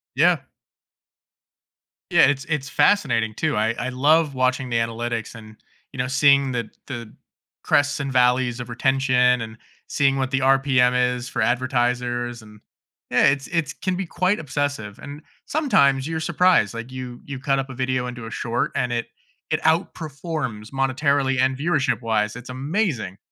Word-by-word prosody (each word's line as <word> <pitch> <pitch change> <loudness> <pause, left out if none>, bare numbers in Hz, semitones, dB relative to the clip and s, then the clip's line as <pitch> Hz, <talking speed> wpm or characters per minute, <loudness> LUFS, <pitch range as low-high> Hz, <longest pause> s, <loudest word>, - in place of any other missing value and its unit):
Yeah. - - +4 1.7
Yeah, - - +6
it's 140 -1 0
it's 150 -4 -2
fascinating 115 - +2
too, 155 -6 -1
I 110 +2 +1
I 130 - -2
love 145 +3 +3
watching 130 0 0
the 115 - 0
analytics, 115 0 -3
and, 110 -1 -12 0.4
you - - -10
know, 125 - 0
seeing 140 0 +4
the 120 -3 -3 0.2
the 120 -5 -7 0.5
crests 145 0 +2
and 140 -1 -3
valleys 125 -1 +2
of 120 0 -6
retention, 125 -1 +2
and 110 0 -7 0.3
seeing 135 -2 +1
what 130 0 -1
the 135 - +1
RPM 130 -2 +3 0.2
is 125 0 -6
for - - -2
advertisers, 120 -1 0
and, 105 -1 -16 0.5
yeah, - - +4
it's 135 0 +1
it's 165 -3 -1
can 185 -1 -3
be 190 0 -3
quite 185 +4 0
obsessive, 140 -8 -3
and 145 +2 -9 0.2
sometimes 140 - +2
you're 160 -1 -2
surprised, 175 - +3
like, 115 +2 -7
you 125 -2 -7
you 140 -2 -6
cut 135 0 0
up 135 0 -4
a 130 - -8
video 130 -1 -1
into 120 -2 -7
a 115 - -8
short, 115 0 -2
and 125 -1 0
it 120 0 -1 0.5
it - - +1
outperforms 155 - -2
monetarily 135 0 +1
and 130 0 +2
viewership-wise, 115 -9 0
it's 125 +1 -10
amazing. 135 - -2
130 Hz, 160 wpm, -22 LUFS, 120-145 Hz, 1.7 s, Yeah